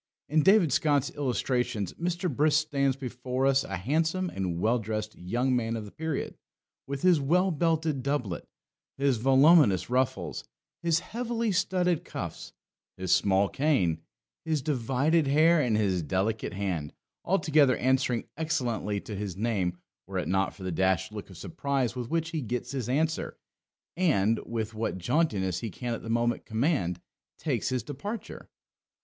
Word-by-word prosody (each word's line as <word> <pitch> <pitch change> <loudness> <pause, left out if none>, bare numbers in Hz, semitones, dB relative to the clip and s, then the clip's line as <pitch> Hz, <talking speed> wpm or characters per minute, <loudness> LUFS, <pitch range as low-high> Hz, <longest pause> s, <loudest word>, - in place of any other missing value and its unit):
In 155 +2 +3
David 190 -5 +5
Scott's 145 -3 +2
Illustrations 125 -5 -1
Mr. 175 +1 -2
Brisk 150 +1 +3
stands 140 -2 +1
before 130 0 -3
us 135 0 +3
a 95 - -4
handsome 160 - 0
and 90 -3 -3
well 115 +6 +2
dressed 110 0 -4
young 120 +8 0
man 115 -1 -1
of 110 -2 -5
the 100 - -11
period, 160 -2 -3 0.5
with 140 0 -4
his 180 -4 +5
well 180 +7 +2
belted 160 -3 0
doublet, 125 -9 -2 0.5
his 140 -3 +2
voluminous 135 - +5
ruffles, 130 -1 0 0.4
his 170 -1 +2
heavily 235 -1 -2
studded 180 -2 +1
cuffs, - - -6 0.5
his 95 -1 -2
small 100 0 +4
cane, 95 - +1 0.4
his 155 -4 -1
divided 140 +3 +1
hair, 155 +4 +5
and 120 -6 +1
his 95 -4 +1
delicate 95 +7 -1
hand, 90 -7 -3 0.3
altogether 155 -7 +3
answering 130 -2 +1
excellently 125 - -1
to 105 - -7
his 95 -3 -4
name, 100 -5 -1 0.3
were - - -4
it - - -2
not 95 +1 0
for 95 - -11
the 95 - -2
dashed 95 +3 +1
look 105 -2 -7
of 95 - -12
surprise 140 - -2
with 125 -2 -4
which 165 0 -1
he 160 -3 -2
gets 125 0 -3
his 130 -4 -3
answer, 160 +4 0 0.6
and, 115 - +2
with 115 -1 -3
what 110 -3 -2
jauntiness 100 - 0
he 115 - -4
can 120 +5 -4
at - - -5
the 115 - -8
moment 120 +1 +1
command, 110 - 0 0.4
takes - - -1
his 130 -1 -1
departure. 200 - -7
130 Hz, 155 wpm, -28 LUFS, 110-155 Hz, 0.6 s, David